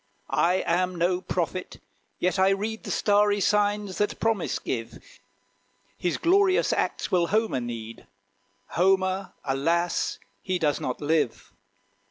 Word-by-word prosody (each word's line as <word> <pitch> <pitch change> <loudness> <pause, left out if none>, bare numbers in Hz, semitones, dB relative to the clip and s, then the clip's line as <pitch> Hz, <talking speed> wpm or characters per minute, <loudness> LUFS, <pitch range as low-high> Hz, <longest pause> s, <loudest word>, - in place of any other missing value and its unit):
I 180 +2 +2
am 180 +2 +1
no 180 +1 +1
prophet, 185 0 -3 0.4
yet 185 +2 0
I 190 +1 +5
read 210 +3 -2
The - - -5
starry 205 0 +3
signs 205 -1 +1
that 205 - 0
promise 220 -6 0
give. 115 -3 -4 1.0
His 175 - -1
glorious 375 +2 +3
acts - - -1
will 175 -2 +3
Homer 215 - +1
need; 115 -1 -7 0.6
Homer, 190 +1 +1
alas! 165 +6 0 0.2
he 185 -1 -1
does 150 -4 +1
not 125 - -3
live. 150 -5 -1
185 Hz, 125 wpm, -26 LUFS, 165-205 Hz, 1.0 s, I